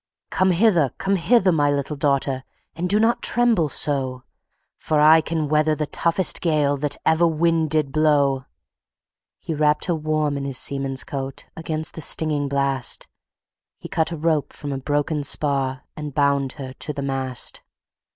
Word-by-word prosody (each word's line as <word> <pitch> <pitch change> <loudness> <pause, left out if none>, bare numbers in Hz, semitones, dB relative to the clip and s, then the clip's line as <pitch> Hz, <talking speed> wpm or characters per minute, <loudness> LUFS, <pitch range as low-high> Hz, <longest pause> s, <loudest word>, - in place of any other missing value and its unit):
"Come 185 0 +2
hither! 175 - +3
come 195 +1 0
hither! 195 +1 +3
my 145 -3 +2
little 145 +1 -2
daughter, 140 -2 0 0.3
And 175 +2 -3
do 205 +3 +3
not 225 +2 +2
tremble 235 -10 +2
so: 130 -4 -1 0.5
For 155 -1 -1
I 155 +2 +6
can 160 -1 -2
weather 155 +1 +2
the 150 -1 -3 0.2
roughest 170 +2 +3
gale, 150 -4 +1
That 145 0 -1
ever 160 +2 +3
wind 165 0 +1
did 150 -2 0
blow." 140 -3 +2 0.9
He 165 - -5
wrapped 150 0 +2
her 175 - 0
warm 155 -2 -1
in 140 - -4
his 135 -2 -2
seaman's 135 -1 -1
coat 135 -1 -6
Against 160 -1 -4
the 160 - -7
stinging 150 -2 +2
blast; 140 -2 -1 0.7
He - - -10
cut 160 +1 0
a 165 - -4
rope 155 -1 -1
from 145 -1 -6
a 135 - -4
broken 145 +2 -1
spar, 140 -2 0
And 150 -3 -7
bound 140 -2 +1
her 135 -3 -8
to 150 - -5
the 140 -1 -5
mast. 130 -2 -2
150 Hz, 165 wpm, -22 LUFS, 140-160 Hz, 0.9 s, I